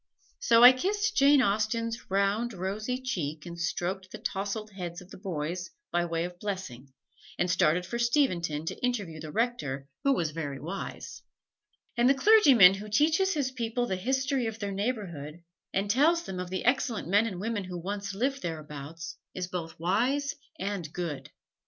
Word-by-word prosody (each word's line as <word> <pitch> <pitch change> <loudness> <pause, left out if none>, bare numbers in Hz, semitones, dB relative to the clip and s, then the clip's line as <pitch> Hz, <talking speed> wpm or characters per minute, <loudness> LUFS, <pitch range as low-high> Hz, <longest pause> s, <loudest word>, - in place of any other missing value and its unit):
So 230 0 +5
I 250 - +12
kissed 410 +10 0
Jane 280 -1 +6
Austen's 225 +2 -1
round, 200 +5 +1
rosy 210 +7 -3
cheek 160 - -3
and 170 -1 -8
stroked 185 +2 -2
the - - -8
tousled 205 +2 -3
heads 175 -3 -6
of 180 +1 -15
the - - -10
boys 175 0 -4 0.2
by 175 0 +1
way 165 -1 -1
of 175 0 -6
blessing, 180 - -5 0.5
and 175 - +1
started 175 +1 +2
for 235 +6 -4
Steventon 180 - +1
to - - -5
interview 205 -11 -1
the 155 -1 -7
Rector 150 - -1 0.2
who 275 -1 +4
was 165 - 0
very 145 -4 -4
wise. 180 +6 -6 0.7
And 240 +1 +4
the 275 - +5
clergyman 270 - +7
who 205 +2 -7
teaches 320 - +3
his 275 -3 0
people 240 -1 -1
the 190 - -1
history 265 +4 0
of 225 -1 -4
their 205 -3 -3
neighborhood, 185 - -4 0.3
and 195 +2 0
tells 305 +10 +3
them 190 - -6
of 180 -1 -4
the 185 0 -3
excellent 245 - +1
men 205 +5 +3
and 185 -5 -5
women 210 -1 -2
who 180 -1 -6
once 200 +3 -4
lived 270 +6 -1
thereabouts, 155 0 -6 0.2
is 185 - -2
both 170 -3 -5
wise 250 - +1 0.2
and 190 -5 -4
good. 170 -5 -4
200 Hz, 170 wpm, -29 LUFS, 175-245 Hz, 0.7 s, I